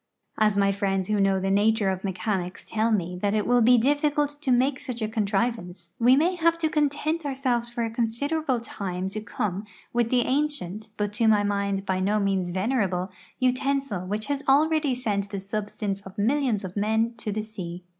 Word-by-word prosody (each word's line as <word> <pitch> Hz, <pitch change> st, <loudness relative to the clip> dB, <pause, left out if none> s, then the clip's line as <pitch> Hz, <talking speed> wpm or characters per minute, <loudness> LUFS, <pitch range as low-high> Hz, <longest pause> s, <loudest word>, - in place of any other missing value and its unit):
As 210 Hz, -2 st, +3 dB
my 200 Hz, 0 st, +3 dB
friends 195 Hz, -1 st, -1 dB
who 210 Hz, -1 st, +1 dB
know 195 Hz, -1 st, +3 dB
tlie 195 Hz, +1 st, -1 dB
nature 205 Hz, 0 st, +3 dB
of 190 Hz, -1 st, -4 dB
meclianics 185 Hz, -1 st, -3 dB
tell 220 Hz, +1 st, +1 dB
me 180 Hz, -4 st, -1 dB
that 205 Hz, 0 st, +1 dB
it 210 Hz, -, +1 dB
will 245 Hz, 0 st, +4 dB
be 245 Hz, +2 st, +6 dB
dillicult 290 Hz, +3 st, +1 dB
to 265 Hz, -, 0 dB
make 260 Hz, +2 st, +2 dB
such 245 Hz, -2 st, -5 dB
a 220 Hz, -, -1 dB
con 215 Hz, -2 st, -1 dB
trivance, 195 Hz, -5 st, -2 dB
we 245 Hz, +2 st, +6 dB
ma^' 350 Hz, +5 st, +1 dB
have 335 Hz, 0 st, +3 dB
to 320 Hz, -2 st, 0 dB
content 305 Hz, +2 st, 0 dB
ourselves 260 Hz, -4 st, -1 dB
for 235 Hz, 0 st, -3 dB
a 225 Hz, -, -2 dB
considerable 255 Hz, +4 st, -1 dB
time 190 Hz, -5 st, -4 dB
to 215 Hz, +2 st, -5 dB
come 205 Hz, -2 st, -3 dB, 0.3 s
with 240 Hz, -1 st, +1 dB
the 250 Hz, 0 st, +3 dB
ancient, 255 Hz, -, -1 dB
but 210 Hz, 0 st, -1 dB
to 225 Hz, +2 st, +1 dB
1113'^ 210 Hz, -2 st, +4 dB
mind 200 Hz, -1 st, -1 dB
by 190 Hz, -1 st, 0 dB
no 205 Hz, +3 st, +1 dB
means 195 Hz, -3 st, 0 dB
venerable, 190 Hz, -2 st, 0 dB, 0.3 s
utensil 255 Hz, -6 st, 0 dB
which 210 Hz, +2 st, -2 dB
has 285 Hz, -1 st, -2 dB
alreadv 290 Hz, -3 st, +3 dB
Pent 200 Hz, -3 st, -1 dB
the 200 Hz, -1 st, -4 dB
substance 205 Hz, 0 st, -4 dB
of 190 Hz, +1 st, -12 dB
mil 250 Hz, +9 st, +2 dB
lions 225 Hz, -7 st, 0 dB
of 185 Hz, -1 st, -7 dB
men 220 Hz, +3 st, +1 dB
to 215 Hz, -1 st, -3 dB
the 215 Hz, +1 st, -2 dB
sea. 185 Hz, -5 st, -7 dB
215 Hz, 200 wpm, -26 LUFS, 195-255 Hz, 0.3 s, be